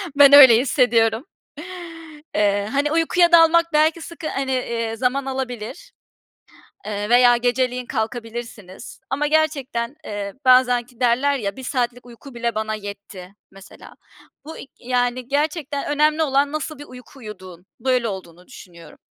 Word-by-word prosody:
Ben 280 -1 +7
öyle 265 -5 +9
hissediyorum. 230 -2 +1 1.1
Eee, 205 0 +1
hani, 285 +2 0
uykuya 340 +2 +2
dalmak 335 0 +5
belki 310 +2 +2
sıkı 325 -1 -8
hani, 270 -1 -3
eee, 230 -3 -3
zaman 260 +3 -1
alabilir, 265 - -6 0.9
eee, 205 0 -4
veya 245 0 +5
geceleyin 250 +1 -1
kalkabilirsiniz 230 -3 -7
ama 290 +2 -1
gerçekten, 285 -5 -1
eee, 200 -1 -6
bazen 250 -1 +4
ki 245 -1 -24
derler 260 +3 +1
ya, 200 -4 -4
"1 265 - -10
saatlik 245 -2 -3
uyku 245 +3 -14
bile 235 0 -3
bana 215 0 -3
yetti," 200 -2 -10 0.2
mesela. 195 +1 -15 0.5
Bu 320 - -9
i - - -10
yani, 245 0 -2
gerçekten 290 0 -2
önemli 305 +2 +2
olan 280 -1 +1
nasıl 310 -1 -5
bir 290 - -9
uyku 255 +1 -15
uyuduğun. 185 -6 -11
Böyle 255 -3 0
olduğunu 180 -3 -9
düşünüyorum. 170 - -15
250 Hz, 140 wpm, -21 LUFS, 225-285 Hz, 1.1 s, öyle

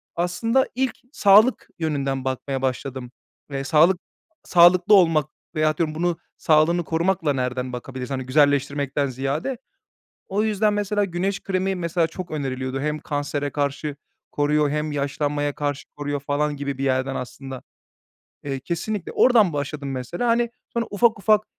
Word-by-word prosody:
Aslında 225 +9 +1
ilk 265 0 0 0.2
sağlık 215 0 +5
yönünden 140 -4 -1
bakmaya 130 +1 -2
başladım 130 -1 -3 0.4
ve 135 -1 -3
sağlık 160 +6 +4 0.4
sağlıklı 175 +3 +5
olmak 165 -6 +5 0.3
veyahut 155 -1 +1
diyorum 155 -2 -1
bunun 175 +1 0 0.2
sağlığını 160 +3 +3
korumakla 165 -1 0
nereden 125 -1 -2
bakabiliriz, 125 +1 -6
hani, 130 -1 -3
güzelleştirmekten 140 0 +2
ziyade. 135 - -2 0.7
O 200 +2 0
yüzden 215 -1 +2
mesela 205 0 0
güneş 195 +2 -2
kremi, 190 0 -1
mesela, 170 -1 0
çok 175 +2 -8
öneriliyordu 135 -3 -3
hem 150 +1 -1
kansere 145 -1 -3
karşı 145 0 -2 0.3
koruyor 150 0 +1
hem 150 +1 -2
yaşlanmaya 145 0 -1
karşı 145 -1 -3
koruyor 145 -1 -3
falan 145 +1 -1
gibi 140 -1 -4
bir 135 - -1
yerden 130 0 0
aslında. 130 +1 -7 0.8
Eee, 135 -2 -3
kesinlikle 175 +6 -3
oradan 220 -9 +5
başladım 145 -1 -4
mesela, 135 - -3
hani, 235 0 +2 0.2
sonra 235 -1 -1
ufak, 220 +1 +3
ufak, 215 +1 +3
150 Hz, 140 wpm, -23 LUFS, 140-185 Hz, 0.8 s, sağlık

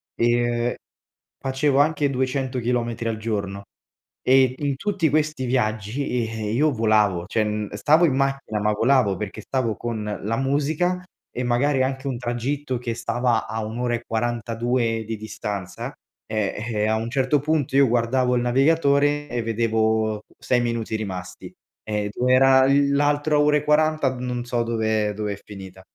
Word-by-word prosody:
ehm, 120 0 +1 0.7
facevo 135 +1 +1
anche 145 -1 +2
200 130 0 -1
chilometri 120 -1 -1
al 110 -1 -1
giorno 100 -3 -3 0.6
e 130 -1 +4
in 145 -2 -1
tutti 195 -5 0
questi 155 -3 0
viaggi, 110 0 -1
uhm, 115 -4 -2
io 150 +3 +3
volavo, 105 -6 +2
cioè 105 -1 -1
stavo 155 +11 +4
in 135 -5 +1
macchina, 135 -6 -1
ma 105 0 +2
volavo 115 -4 +2
perché 105 +1 -6
stavo 115 -2 -1
con 115 -3 -4 0.2
la 115 +2 -1
musica 150 +7 0 0.3
e 125 - -3
magari 130 +3 +2
anche 130 +1 -3
un 130 -3 -2
tragitto 130 +3 -2
che 120 -1 -3
stava 120 -1 0
a 110 -1 -3
1 110 +3 -6
ora 120 -1 0
e 120 - -6
42 115 0 -1
di 110 0 -4
distanza, 100 -3 -5 0.4
eh-eh 110 0 -1
a 110 - +2
un 115 +1 -3
certo 135 +2 +2
punto 150 -2 -1
io 140 -1 +6
guardavo 125 +2 +1
il 120 - +1
navigatore 145 +2 +2
e 120 -1 -2
vedevo 110 -1 +1 0.2
6 125 -1 +1
minuti 115 -2 -2
rimasti. 90 -4 -6 0.3
Era 125 +6 +3
l'altra 145 +2 +2
ora 150 0 +4
e 150 - -3
40 150 -2 +2
non 125 -1 -3
so 120 -1 -1
dove 110 -2 0
dove 105 -1 -2
è 100 - -11
finita. 95 -2 -11
120 Hz, 150 wpm, -23 LUFS, 110-135 Hz, 0.7 s, io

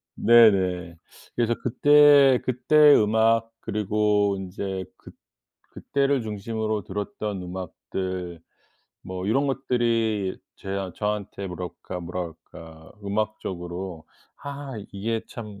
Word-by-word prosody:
네네. 95 -7 +4 0.4
그래서 120 -1 +1
그때, 145 0 +6
그때 145 +4 +5
음악 110 +1 +3
그리고 105 -1 +1
인제 95 0 -5
그 - - -14 0.6
그때를 140 -2 0
중심으로 110 0 -3
들었던 100 0 -4
음악들 90 -1 -5 0.6
뭐 95 0 -6
이런 135 +7 +2
것들이 115 -6 0 0.2
제 - - -11
아 95 -2 -3
저한테 105 -2 -3
뭐랄까 90 0 -7
뭐라 85 0 -5
그럴까. 80 -1 -13
음악적으로 95 -4 -4 0.4
'아 140 -1 -7 0.2
이게 110 +3 -2
참 105 -3 -9
105 Hz, 225 characters per minute, -25 LUFS, 95-115 Hz, 0.6 s, 그때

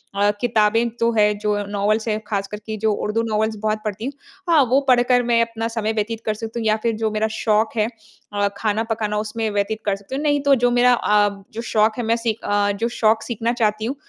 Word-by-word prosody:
अ, 205 +1 +3
किताबें 230 0 +2
तो 230 0 +2
हैं, 210 -1 +3
जो 210 0 0
नॉवेल्स 210 +2 0
हैं, 215 -1 0
खासकर 200 0 -3
कि 220 - -4
जो 220 - +3
उर्दू 210 +2 0
नॉवेल्स 220 0 0
बहुत 215 0 0
पढ़ती 215 +2 -4
हूँ। 275 - -4 0.4
हाँ, 320 -4 +6
वो 260 +2 +4
पढ़ 250 -1 +5
कर 245 -1 +4
मैं 235 -1 +3
अपना 230 -1 -2
समय 225 -1 -2
व्यतीत 220 +1 -2
कर 215 - +1
सकती 225 +2 -6
हूँ 225 - -4
या 215 - +4
फिर 230 -1 +1
जो 220 -1 -1
मेरा 215 +1 0
शौक 220 0 +1
है 215 0 +2 0.5
अ, 205 0 +1
खाना 215 0 0
पकाना, 210 -1 -1
उसमें 220 +1 -2
व्यतीत 205 +2 -1
कर 200 -2 +1
सकती 200 +6 -8
हूँ। 290 - -3
नहीं, 290 -1 +2
तो 280 -1 +5
जो 245 - +4
मेरा 250 0 +6
अ, 210 -3 +3 0.2
जो 230 - -4
शौक 215 +1 +2
है, 245 - -2
मैं 230 - +2
सीख 225 -1 -2
अ, 205 0 +1
जो 220 +4 -2
शौक 220 0 +3
सीखना 235 0 -2
चाहती 215 0 +1
हूँ, 255 +5 -2
220 Hz, 240 wpm, -21 LUFS, 210-230 Hz, 0.5 s, हाँ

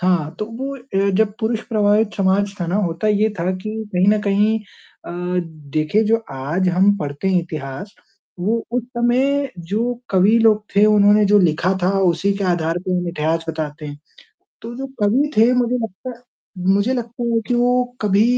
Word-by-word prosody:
हाँ, 175 -4 0
तो 210 - -2
वो 265 +5 -6 0.2
ए 195 +1 +2
जब 220 -1 +2
पुरुष 220 0 -1
प्रभावित 210 -1 +2
समाज 195 +1 +1
था 175 - -1
ना 180 +4 -1
होता 170 +5 -2
ये 210 +1 +2
था 170 +2 0
कि 190 +3 -6 0.2
कहीं 180 +1 +3
न 210 0 +3
कहीं 210 +2 +2
अ, 205 - -16 0.6
देखिए 155 +8 +2
जो 225 +2 +3 0.2
आज 155 +8 -1
हम 190 +3 +3
पढ़ते 145 +3 -3
हैं 185 -2 +3
इतिहास, 160 - -7 0.5
वो 220 +5 +1
उस 245 - 0
समय 265 +4 +1
जो 215 +8 -2 0.2
कवि 195 +4 +4
लोग 215 -2 +3
थे 200 +1 +5
उन्होंने 210 0 +5
जो 205 +1 +5
लिखा 175 0 +2
था 180 - +3
उसी 180 +1 +2
के 200 - -2
आधार 165 -1 0
पे - - -1
हम 180 -1 -1
इतिहास 165 0 -1
बताते 155 -1 -5
हैं। 145 0 -8 0.6
तो 235 +1 -7
जो 270 +1 -5 0.2
कवि 255 +9 +2
थे 230 +3 +5
मुझे 250 0 +1
लगता 225 +2 -5
है 240 - -24 0.5
मुझे 200 +6 +1
लगता 240 -1 -5
है 235 - -1
वो 230 -1 +1
कि 245 - 0
वो 245 +1 +2 0.2
कभी 205 0 +3
205 Hz, 190 wpm, -19 LUFS, 175-225 Hz, 0.6 s, थे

